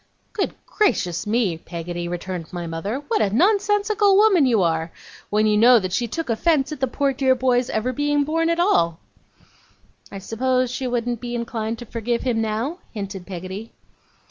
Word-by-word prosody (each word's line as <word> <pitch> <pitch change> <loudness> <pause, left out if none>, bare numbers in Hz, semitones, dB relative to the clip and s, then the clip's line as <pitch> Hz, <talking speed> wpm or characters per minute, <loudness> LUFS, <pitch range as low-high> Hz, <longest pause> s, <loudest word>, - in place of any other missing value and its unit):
'Good 405 - -2
gracious 180 - 0
me, 210 -7 +1
Peggotty,' 175 +1 -5
returned 175 -1 -5
my 175 -1 -5
mother, 195 - -4
'what 450 -2 +1
a 200 - +2
nonsensical 405 - +3
woman 395 -9 +5
you 225 -6 +3
are! 165 0 0 0.4
when 210 +1 +2
you 210 0 +3
know 240 +3 +7
that 185 -4 -2
she 240 +4 0
took 330 +8 -4
offence 275 +4 +1
at 305 - -5
the 265 - +1
poor 275 +2 0
dear 260 0 +2
boy's 250 -1 +1
ever 240 +4 -1
being 290 +2 +1
born 330 +3 0
at 335 0 0
all.' 170 - +2 1.1
'I 195 - -6
suppose 255 +5 0
she 260 0 -3
wouldn't 240 -1 -2
be 240 -1 -4
inclined 230 -1 -3
to 240 - -9
forgive 235 +1 -2
him 235 -3 0
now,' 225 - -2
hinted 195 -4 -6
Peggotty. 190 +4 -7
235 Hz, 175 wpm, -22 LUFS, 195-285 Hz, 1.1 s, know